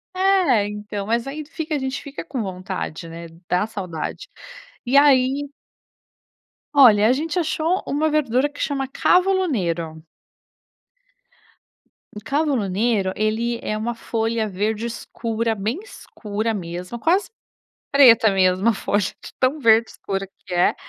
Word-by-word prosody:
É, 370 - +3
então, 210 -1 -6
mas 230 +1 0
aí 295 +3 -5
fica 315 0 -4
a 290 - -1
gente 265 0 -3
fica 285 +2 -7
com 265 -8 -4
vontade, 185 -3 -5
né. 170 +1 -8 0.2
Dá 180 +3 +2
saudade 195 - -6 0.6
e 265 +3 +3
aí 280 0 +4 1.3
Olha, 220 -6 +7
a 245 - +4
gente 320 +6 -2
achou 330 +2 0
uma 310 +2 0
verdura 285 -2 +1
que 290 - -15
chama 270 -3 -1
cavolo 375 +6 +2
nero. 170 - -2 2.1
O 210 - -5
cavolo 275 -5 0
nero, 200 -1 +1
ele 230 +2 -1
é 215 - -2
uma 230 +2 -3
folha 225 -1 -1
verde 210 +4 -2
escura, 230 -1 -3
bem 220 - -2
escura 225 - -5
mesmo, 180 +3 -6
quase 365 - +2 0.6
preta 235 -7 +7
mesmo 190 +2 +2
a 225 - +3
folha 205 +1 0
de - - -8
tão 260 +4 +2
verde 230 -3 +4
escura 195 -1 -5 0.2
que 185 - -10
é. 175 0 +3
230 Hz, 140 wpm, -22 LUFS, 205-285 Hz, 2.1 s, Olha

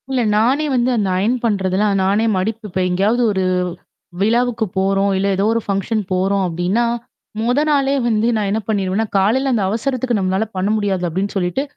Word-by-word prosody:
இல்ல, 260 -2 0 0.2
நானே 260 +8 +2
வந்து 245 0 +2
அந்த 200 -3 0
அயர்ன் 215 +7 +1
பண்றதுல்லாம் 200 -1 +1
நானே 200 +4 +2
மடிப்பு 215 +3 -3
இப்ப 185 - -3
எங்கேயாவது 200 +7 +1
ஒரு 190 -2 -1 0.8
விழாவுக்கு 230 +1 +1
போறோம் 195 +1 +2
இல்ல 195 +1 0
ஏதோ 195 +2 0
ஒரு 230 - 0
ஃபங்ஷன் 200 +2 -1
போறோம் 190 +2 +1
அப்பிடின்னா 180 +7 0 0.6
முதல் 245 +4 +1
நாளே 275 -2 +2
வந்து 220 0 +1
நான் 210 -2 0
என்ன 215 - 0
பண்ணிருவேன்னா, 200 0 0
காலையில 250 +8 +2
அந்த 220 -4 +1
அவசரத்துக்கு 245 +2 -1
நம்மளால 190 +3 0
பண்ண 190 +2 0
முடியாது 195 -3 -1
அப்பிடின்னு 190 +5 -3
சொல்லிட்டு, 180 +7 -1
205 Hz, 170 wpm, -18 LUFS, 190-235 Hz, 0.8 s, நானே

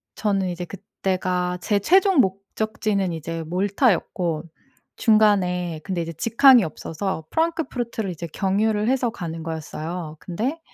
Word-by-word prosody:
저는 195 -3 0
이제 175 0 -4
그때가 185 -1 -2
제 205 - +1
최종 375 - +4
목적지는 200 -1 0
이제 165 +1 -4
몰타였고 180 - 0 0.5
중간에 185 -7 +3
근데 185 -3 -2
이제 165 0 -5
직항이 235 - +6
없어서 160 +1 -4
프랑크푸르트를 260 - -1
이제 170 0 -6
경유를 210 +5 0
해서 260 -2 +2
가는 165 -6 -6
거였어요. 160 0 -5
근데 235 - -3
190 Hz, 305 characters per minute, -23 LUFS, 170-220 Hz, 0.5 s, 직항이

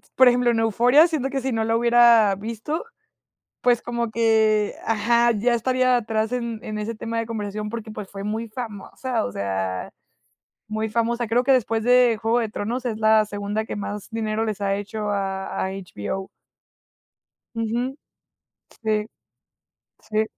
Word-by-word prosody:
por 260 - +7
ejemplo, 245 0 +4
en 225 - 0
Euphoria, 245 - +5
siento 290 -5 -2
que 270 -1 -2
si 265 0 -2
no 225 -1 0
la 225 +1 +1
hubiera 235 -3 +5
visto, 230 - -4 0.8
pues 245 -1 +3
como 235 -1 -2
que 220 -2 +2
ajá, 235 +2 +3
ya 235 +3 +1
estaría 255 +2 +2
atrás 220 0 -1
en 235 -3 -3
en 215 -2 -4
ese 220 +2 -4
tema 230 +1 -3
de 230 - -3
conversación 210 -1 -4
porque, 225 -1 -6
pues 210 -2 -7
fue 195 0 -7
muy 220 +2 -3
famosa, 230 +2 -4
o 100 - -4
sea, 95 -2 -3 0.8
muy 215 0 -2
famosa. 235 +1 0
Creo 235 +3 +2
que, 270 - +4
después 225 -3 +1
de 245 -2 +5
Juego 230 +2 +2
de 225 - -1
Tronos, 235 +5 -3
es 220 -3 -2
la 220 0 +4
segunda 205 +1 -3
que 220 - -6
más 205 0 -5
dinero 220 -1 -1
les 215 -2 -3
ha 195 -1 +1
hecho 210 +1 -4
a 195 -1 -3
a 190 - -2
HBO. 190 - -5 1.3
Ujú. 235 +4 -2 0.9
Sí. 215 -1 0 1.0
Sí. 215 0 0
225 Hz, 160 wpm, -23 LUFS, 210-240 Hz, 1.3 s, por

